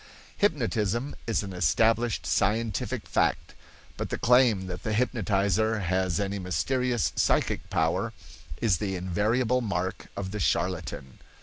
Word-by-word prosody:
Hypnotism 120 Hz, -, 0 dB
is 110 Hz, -4 st, +1 dB
an 95 Hz, -2 st, -6 dB
established 110 Hz, +8 st, +2 dB
scientific 105 Hz, +4 st, 0 dB
fact; -, -, 0 dB, 0.4 s
but -, -, -3 dB
the -, -, -2 dB
claim 120 Hz, -5 st, +4 dB
that 90 Hz, -1 st, -6 dB
the 110 Hz, -, -2 dB
hypnotizer 105 Hz, -2 st, +1 dB
has 95 Hz, -1 st, 0 dB
any 100 Hz, 0 st, -2 dB
mysterious 120 Hz, +6 st, 0 dB
psychic -, -, +1 dB
power -, -, 0 dB, 0.5 s
is 100 Hz, -8 st, +2 dB
the 95 Hz, -2 st, -2 dB
invariable 110 Hz, +8 st, +1 dB
mark 95 Hz, -4 st, -3 dB
of 95 Hz, -1 st, -4 dB
the 105 Hz, -, -4 dB
charlatan. 85 Hz, -3 st, -2 dB
105 Hz, 125 wpm, -27 LUFS, 95-115 Hz, 0.5 s, claim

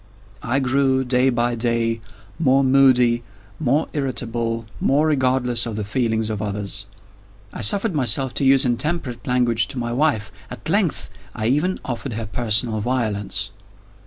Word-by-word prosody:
I 120 Hz, +4 st, -1 dB
grew, 130 Hz, 0 st, +2 dB
day 125 Hz, +1 st, +2 dB
by 120 Hz, -1 st, 0 dB
day, 115 Hz, -1 st, 0 dB, 0.4 s
more 135 Hz, -3 st, +3 dB
moody, 130 Hz, -3 st, +4 dB, 0.4 s
more 145 Hz, +2 st, +1 dB
irritable, 115 Hz, -4 st, -2 dB
more 145 Hz, +3 st, +2 dB
regardless 130 Hz, -5 st, +1 dB
of 115 Hz, -, -5 dB
the 105 Hz, -, -3 dB
feelings 110 Hz, 0 st, -1 dB
of 105 Hz, -1 st, -4 dB
others. 100 Hz, -1 st, -4 dB, 0.7 s
I -, -, -6 dB
suffered 200 Hz, -, +2 dB
myself 135 Hz, -2 st, +1 dB
to -, -, -1 dB
use 135 Hz, 0 st, +5 dB
intemperate 125 Hz, 0 st, -1 dB
language 120 Hz, -3 st, +2 dB
to -, -, -4 dB
my 120 Hz, -1 st, -2 dB
wife. 120 Hz, -7 st, 0 dB, 0.2 s
At -, -, -8 dB
length, 185 Hz, -, 0 dB, 0.2 s
I 110 Hz, -, -3 dB
even 150 Hz, +10 st, +1 dB
offered 120 Hz, 0 st, -4 dB
her 110 Hz, +1 st, -4 dB
personal 110 Hz, 0 st, +1 dB
violence. 105 Hz, -4 st, -1 dB
120 Hz, 145 wpm, -21 LUFS, 115-135 Hz, 0.7 s, use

